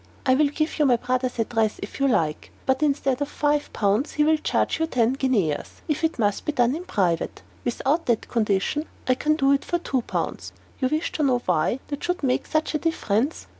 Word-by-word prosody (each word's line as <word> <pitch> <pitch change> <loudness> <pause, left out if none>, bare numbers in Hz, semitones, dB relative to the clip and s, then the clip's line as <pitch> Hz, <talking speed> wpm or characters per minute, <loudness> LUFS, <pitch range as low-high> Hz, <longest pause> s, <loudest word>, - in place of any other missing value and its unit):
I 260 - +5
will 295 +3 +4
give 310 +2 -2
you 300 - +4
my 250 - +5
brother's 250 +1 -1
address 225 -1 0
if 200 - -8
you 275 - +3
like; 160 - 0
but 265 +1 +1
instead 275 -3 +1
of 285 - -1
five 295 0 0
pounds, 210 +7 +1
he 300 - +2
will 315 +1 +4
charge 310 - 0
you 320 - +1
ten 245 -4 +2
guineas 230 - -1
if 305 0 -1
it 320 0 +1
must 205 -4 0
be - - -1
done 245 -1 +2
in 345 +3 -6
private. 175 - -1 0.2
Without 275 +7 0
that 235 -3 +1
condition, 225 +7 0 0.2
I 255 - +5
can 305 +4 +1
do 275 -3 +3
it 280 - +2
for 345 - 0
two 270 -7 -1
pounds. - - -4 0.3
You 260 - +2
wish 310 +4 -1
to - - -3
know 260 -3 +3
why 180 +9 +1
that 285 -1 -5
should 355 -3 -2
make 255 -2 +1
such 310 0 0
a 305 - 0
difference. 280 -4 0
265 Hz, 215 wpm, -24 LUFS, 230-300 Hz, 0.3 s, I